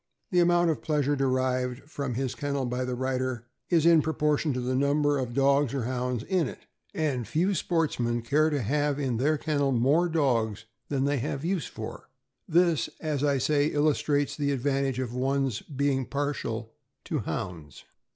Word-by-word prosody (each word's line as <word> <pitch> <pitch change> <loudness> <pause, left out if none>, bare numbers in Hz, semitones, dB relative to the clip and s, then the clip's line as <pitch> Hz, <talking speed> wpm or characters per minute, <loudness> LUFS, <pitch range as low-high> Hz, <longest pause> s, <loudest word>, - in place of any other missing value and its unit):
The 180 - +3
amount 175 -1 +4
of 155 - -4
pleasure 145 -2 +1
derived 130 -1 0
from 140 -5 -4
his 130 0 -1
kennel 140 -2 -2
by 125 +1 -2
the 125 0 -2
writer 130 -2 -2 0.2
is 165 -3 +3
in 165 -2 +7
proportion 150 0 +1
to 125 - -2
the 125 +1 -1
number 145 +2 +2
of 120 -2 -4
dogs 140 -1 +3
or 135 - -1
Hounds 125 -1 -2
in 180 -6 +1
it, - - -10 0.3
and 135 -8 -1
few 170 - +1
sportsmen 145 -10 0
care 150 +6 +3
to 145 -5 -1
have 145 +4 0
in 130 -5 -1
their 150 +5 +2
kennel 145 -2 0
more 140 +8 +3
dogs 115 -9 0 0.2
than 135 -2 0
they 145 -1 +1
have 135 +5 -3
use 180 -3 -1
for. - - -8 0.4
This, 170 -2 +3
as 150 -3 -2
I 140 -1 +3
say, 145 +2 +2
illustrates 145 -1 +1
the 145 -1 0
advantage 135 -1 0
of 125 -2 -3
one's 135 -2 0
being 140 -2 -1
partial 125 -6 -3 0.3
to - - -2
Hounds. 80 -6 -5
140 Hz, 170 wpm, -27 LUFS, 125-150 Hz, 0.4 s, in